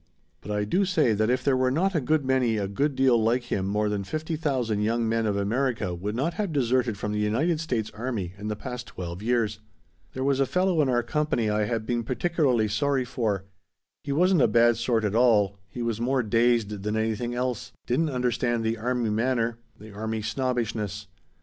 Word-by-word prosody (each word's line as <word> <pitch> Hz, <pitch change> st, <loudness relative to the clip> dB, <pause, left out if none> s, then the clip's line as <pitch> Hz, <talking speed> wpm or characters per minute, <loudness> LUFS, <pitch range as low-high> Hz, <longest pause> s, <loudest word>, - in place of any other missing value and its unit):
But 105 Hz, -, -11 dB
I 105 Hz, 0 st, 0 dB
do 180 Hz, -, +1 dB
say 160 Hz, -, +2 dB
that 110 Hz, +2 st, +1 dB
if 130 Hz, +1 st, +1 dB
there 140 Hz, -1 st, +3 dB
were 130 Hz, 0 st, +2 dB
not 180 Hz, +9 st, +1 dB
a 160 Hz, -, +1 dB
good 150 Hz, +2 st, +1 dB
many 130 Hz, -4 st, +2 dB
a 100 Hz, -2 st, -1 dB
good 140 Hz, +8 st, -1 dB
deal 130 Hz, -3 st, +4 dB
like 120 Hz, +3 st, +2 dB
him 95 Hz, -1 st, 0 dB
more 105 Hz, +1 st, 0 dB
than 105 Hz, -1 st, -1 dB
fifty 155 Hz, -, -3 dB
thousand 130 Hz, -9 st, -1 dB
young 115 Hz, +2 st, +1 dB
men 115 Hz, 0 st, +1 dB
of 100 Hz, -1 st, 0 dB
America 110 Hz, -2 st, 0 dB
would 100 Hz, +5 st, -4 dB
not 150 Hz, +8 st, 0 dB
have 200 Hz, -5 st, -2 dB
deserted 125 Hz, -5 st, +1 dB
from 105 Hz, +1 st, -3 dB
the 105 Hz, -, -1 dB
United 135 Hz, +11 st, +1 dB
States 120 Hz, -9 st, -2 dB
army 110 Hz, -6 st, -4 dB
in 105 Hz, -, -5 dB
the 105 Hz, -, -2 dB
past 125 Hz, +1 st, -7 dB
twelve 85 Hz, 0 st, -7 dB
years. 110 Hz, -2 st, 0 dB, 0.5 s
"There 130 Hz, -, -3 dB
was 135 Hz, 0 st, +1 dB
a 135 Hz, -, +2 dB
fellow 180 Hz, -1 st, +2 dB
in 140 Hz, -, +1 dB
our 120 Hz, -1 st, +2 dB
company 120 Hz, -4 st, 0 dB
I 105 Hz, 0 st, +1 dB
had 115 Hz, -1 st, -2 dB
been 120 Hz, 0 st, 0 dB
particularly 130 Hz, -3 st, +1 dB
sorry 130 Hz, +5 st, 0 dB
for. 110 Hz, -6 st, -2 dB, 0.6 s
He 145 Hz, -, -4 dB
wasn't 180 Hz, +3 st, +3 dB
a -, -, +5 dB
bad 120 Hz, 0 st, +4 dB
sort 115 Hz, -1 st, 0 dB
at 105 Hz, -, -1 dB
all; 105 Hz, -4 st, +3 dB
he 120 Hz, -, -5 dB
was 115 Hz, -1 st, -2 dB
more 130 Hz, +1 st, +1 dB
dazed 115 Hz, -2 st, +1 dB
than 105 Hz, +2 st, -2 dB
anything 110 Hz, +2 st, -1 dB
else; 125 Hz, -2 st, -2 dB
didn't 155 Hz, +6 st, +1 dB
understand 120 Hz, -2 st, 0 dB
the 110 Hz, +1 st, 0 dB
army 120 Hz, -1 st, 0 dB
manner; 115 Hz, 0 st, 0 dB, 0.2 s
the 110 Hz, +1 st, -11 dB
army 110 Hz, +1 st, -3 dB
snobbishness. 110 Hz, -5 st, -2 dB
120 Hz, 205 wpm, -26 LUFS, 105-130 Hz, 0.6 s, a